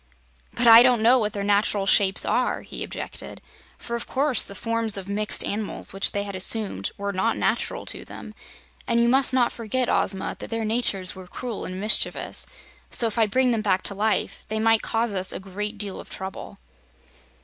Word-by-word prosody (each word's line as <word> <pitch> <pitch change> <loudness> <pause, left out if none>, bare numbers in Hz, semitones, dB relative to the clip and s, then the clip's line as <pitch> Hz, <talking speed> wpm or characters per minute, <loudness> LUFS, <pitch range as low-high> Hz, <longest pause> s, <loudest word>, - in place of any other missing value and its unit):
"But 245 - +1
I 230 0 +10
don't 245 -3 +3
know 250 +3 +5
what 215 -2 -1
their 200 - -3
natural 205 0 +1
shapes 195 0 +3
are," - - 0
he - - -6
objected, - - -8 0.4
"for 235 - -5
of 235 - -5
course 270 -3 +1
the 200 - -9
forms 230 -1 -2
of 195 -1 -7
mixed 210 +1 +1
animals 205 -2 -4
which 195 0 +3
they 200 - -2
had 200 -1 -7
assumed 190 - 0
were 200 0 -3
not 210 +5 0
natural - - -1
to - - 0
them. - - -10 0.5
And 235 -1 +2
you 235 - +3
must 265 +2 +4
not 255 -2 +2
forget, 240 +2 -2
Ozma, 190 -1 0
that - - -8
their 225 -1 -2
natures 215 -5 0
were 185 -1 -11
cruel 240 +4 -6
and 185 0 -6
mischievous, 215 +2 +1 0.4
so 235 - +2
if 225 0 -1
I 220 - +4
bring 255 +4 +2
them 225 -2 0
back 190 -3 0
to - - 0
life 210 +2 -1
they 220 0 -2
might 225 0 +3
cause 230 -1 -1
us 185 -1 +1
a - - -4
great 205 +3 -6
deal 200 -2 -5
of - - -11
trouble." 190 +1 -8
215 Hz, 200 wpm, -24 LUFS, 200-235 Hz, 0.5 s, I